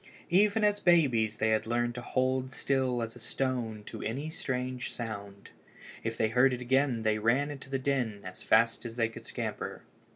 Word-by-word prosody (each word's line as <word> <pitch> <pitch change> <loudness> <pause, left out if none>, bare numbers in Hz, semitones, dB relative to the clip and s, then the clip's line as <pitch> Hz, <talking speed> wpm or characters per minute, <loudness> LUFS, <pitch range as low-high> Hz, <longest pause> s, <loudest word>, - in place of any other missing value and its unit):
_] - - -32 0.3
Even 205 +4 +4
as 205 0 +3
babies 125 - +3
they 110 -1 +1
had 110 0 +1
learned 120 +1 0
to 125 - -6
hold 130 +1 0
still 130 -3 0
as 115 +1 -5
a - - -11
stone 115 -3 -2
at - - -6
any 140 +8 -3
strange 125 -4 -3
sound. 100 -4 -7 0.5
If 115 0 -3
they 110 - +2
heard 125 +3 +4
it 125 - -3
again 130 -2 +2
they 110 -1 +2
ran 135 +7 +2
to 130 - -11
the 135 - 0
den 130 -6 -1
as 95 0 -8
fast 115 +1 +3
as 115 -2 -6
they 115 -2 +1
could 115 - -10
scamper. - - -4
125 Hz, 195 wpm, -30 LUFS, 115-135 Hz, 0.5 s, Even